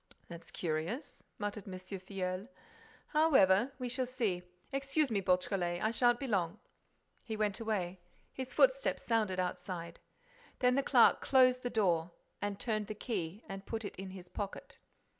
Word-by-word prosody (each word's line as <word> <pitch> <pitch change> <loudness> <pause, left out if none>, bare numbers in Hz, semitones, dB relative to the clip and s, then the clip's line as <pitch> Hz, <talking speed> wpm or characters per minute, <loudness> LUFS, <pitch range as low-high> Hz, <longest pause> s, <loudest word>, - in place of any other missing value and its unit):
"That's 170 -1 -10
curious," 170 - -3
muttered 205 -1 -4
M. 185 -1 -5
Filleul. 185 +1 -4 0.6
"However—we 260 -4 +4
shall 255 +1 -1
see. 225 -8 -1 0.3
Excuse 275 +1 +1
me, 200 -2 +1
Beautrelet, 180 -1 +1
I 220 - +1
shan't 240 0 +3
be 275 - -3
long." 185 -8 0 0.7
He 220 -2 -4
went 210 -2 0
away. 190 -5 -2 0.3
His 260 -1 -5
footsteps - - +3
sounded 215 -5 +1
outside. 180 -2 -4 0.6
Then 250 0 +4
the 275 - +3
clerk 255 -3 +5
closed 255 -1 +5
the 245 - -2
door, 175 -7 +2 0.5
turned 215 -2 -1
the 215 - -5
key 200 -3 -4
and 195 0 -7
put 225 -1 -3
it - - -6
in 190 +1 -6
his 185 -1 -10
pocket. 200 +1 -6
205 Hz, 145 wpm, -34 LUFS, 185-250 Hz, 0.7 s, clerk